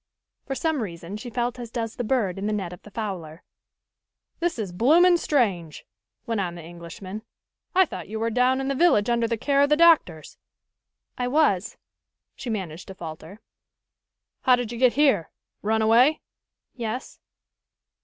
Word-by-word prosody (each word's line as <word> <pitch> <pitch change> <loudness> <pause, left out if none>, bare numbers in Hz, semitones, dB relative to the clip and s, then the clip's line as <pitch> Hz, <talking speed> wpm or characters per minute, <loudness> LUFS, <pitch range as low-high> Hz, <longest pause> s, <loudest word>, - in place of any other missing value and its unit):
For 270 - -2
some 320 -2 0
reason 170 -2 -6
she 240 +3 -7
felt 240 +1 -2
as 240 -2 -6
does 230 -1 -4
the 245 - -3
bird 215 -6 0
in 200 - -2
the 215 - 0
net 190 -4 -3
of 180 - -12
the - - -14
fowler. 185 -7 -6 1.0
"This 345 -3 -1
is 205 -5 -4
bloomin' 335 - +5
strange," 195 - 0 0.4
went 230 -4 -1
on 175 -2 -3
the 170 - -9
Englishman. 175 +4 -9 0.5
"I 375 0 +6
thought 180 - -8
you 220 +2 -5
were 230 +1 -1
down 255 +3 +2
in 270 - -2
the 275 - 0
village, 260 -8 +3
under 235 -1 +1
the 230 0 -1
care 280 +5 +2
of 285 - +4
the 300 - +4
doctors." 325 - +3 0.8
"I 245 - 0
was," 250 - +1 0.6
she 250 - -7
managed 185 -6 -5
to 190 - -9
falter. 165 +3 -9 1.0
"How 255 - +5
did 245 -2 -4
you 235 - -6
get 255 -2 +4
here 275 - +3 0.3
run 220 +1 +1
away?" 245 +8 +4 0.5
"Yes." 240 +1 -5
225 Hz, 170 wpm, -25 LUFS, 190-260 Hz, 1.0 s, I